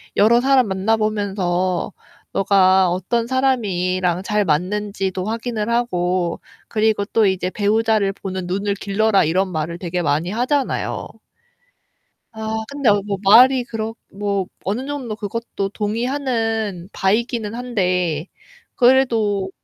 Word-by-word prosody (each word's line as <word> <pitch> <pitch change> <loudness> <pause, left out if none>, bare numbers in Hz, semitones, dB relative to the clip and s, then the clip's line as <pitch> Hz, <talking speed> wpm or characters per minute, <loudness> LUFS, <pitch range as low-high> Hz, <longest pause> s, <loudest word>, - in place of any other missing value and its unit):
여러 235 +3 +5
사람 265 -2 +4
만나 195 +3 +1
보면서 195 -4 -1 0.4
너가 190 -1 +4
어떤 190 +6 -1
사람이랑 185 -9 0
잘 210 +1 0
맞는지도 190 +3 -1
확인을 225 0 -3
하고 180 -7 0 0.3
그리고 215 -2 +1
또 220 +1 +2
이제 185 -2 0
배우자를 210 0 +1
보는 190 -2 -5
눈을 200 +3 -1
길러라." 200 +1 +2
이런 185 +4 0
말을 165 +1 -3
되게 175 0 -3
많이 155 +3 0
하잖아요. 255 +6 -1 1.2
아, 220 0 -4
근데 280 -4 0 0.4
말이 250 +5 +7 0.5
뭐 200 -1 -2 0.2
어느 225 +7 -2
정도 265 -7 -4
그것도 205 -1 -4
동의하는 225 -4 -2
바이기는 220 +2 0
한데 180 -9 -1 0.5
그래도 230 -7 +3
205 Hz, 250 characters per minute, -20 LUFS, 185-230 Hz, 1.2 s, 말이